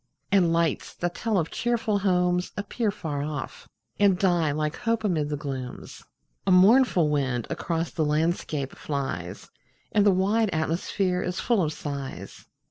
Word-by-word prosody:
And 185 Hz, -4 st, +4 dB
lights, 165 Hz, -3 st, 0 dB
that 175 Hz, 0 st, -2 dB
tell 225 Hz, -3 st, -1 dB
of 165 Hz, -3 st, -1 dB
cheerful 230 Hz, -3 st, 0 dB
homes, 180 Hz, -2 st, +1 dB
appear 205 Hz, +2 st, -1 dB
Far 160 Hz, -8 st, -4 dB
off, 145 Hz, -1 st, -6 dB, 0.3 s
and 200 Hz, -3 st, +4 dB
die 175 Hz, -5 st, +2 dB
like 150 Hz, +1 st, -2 dB
hope 230 Hz, -1 st, -1 dB
amid 160 Hz, -8 st, 0 dB
the 150 Hz, -, -2 dB
glooms. 135 Hz, -3 st, -7 dB, 0.4 s
A -, -, +4 dB
mournful 190 Hz, -, +5 dB
wind 135 Hz, -5 st, 0 dB
across 165 Hz, -1 st, -2 dB
the 160 Hz, -, -1 dB
landscape 150 Hz, -2 st, 0 dB
flies, 135 Hz, -, -4 dB, 0.4 s
And 210 Hz, -, +3 dB
the 205 Hz, -, +5 dB
wide 200 Hz, +4 st, +2 dB
atmosphere 180 Hz, +3 st, -1 dB
is 180 Hz, 0 st, -3 dB
full 235 Hz, -5 st, +2 dB
of 155 Hz, -3 st, 0 dB
sighs. 140 Hz, -3 st, -7 dB
175 Hz, 150 wpm, -26 LUFS, 150-200 Hz, 0.4 s, mournful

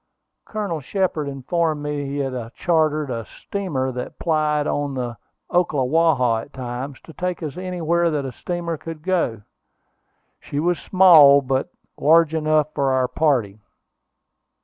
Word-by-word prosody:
Colonel 205 Hz, -7 st, -3 dB
Shepard 165 Hz, -1 st, -1 dB
informed 150 Hz, +3 st, -1 dB
me 145 Hz, 0 st, -2 dB
that 145 Hz, -, -4 dB
he 140 Hz, +1 st, -4 dB
had 130 Hz, -4 st, -4 dB
chartered 155 Hz, -4 st, +1 dB
a 115 Hz, -1 st, -3 dB
steamer 145 Hz, -, -4 dB
that 125 Hz, 0 st, -6 dB
plied 155 Hz, -2 st, +1 dB
on 145 Hz, -2 st, -2 dB
the 120 Hz, -4 st, -4 dB, 0.3 s
Ocklawaha 145 Hz, -7 st, +2 dB
at -, -, -25 dB
times, 130 Hz, +2 st, -6 dB
to 160 Hz, -, -14 dB
take 180 Hz, 0 st, -3 dB
us 150 Hz, -2 st, -5 dB
anywhere 170 Hz, -2 st, 0 dB
that 150 Hz, -3 st, -2 dB
a 130 Hz, -, -4 dB
steamer 170 Hz, +5 st, -4 dB
could 160 Hz, 0 st, -8 dB
go. 165 Hz, -, -1 dB, 1.0 s
She 145 Hz, -, -5 dB
was 175 Hz, +2 st, +1 dB
small, 155 Hz, -7 st, +7 dB
but 130 Hz, 0 st, -1 dB, 0.3 s
large 160 Hz, +1 st, +4 dB
enough 155 Hz, -1 st, +1 dB
for 140 Hz, -2 st, +1 dB
our 130 Hz, -1 st, +2 dB
party. 125 Hz, -10 st, 0 dB
150 Hz, 145 wpm, -22 LUFS, 130-170 Hz, 1.0 s, small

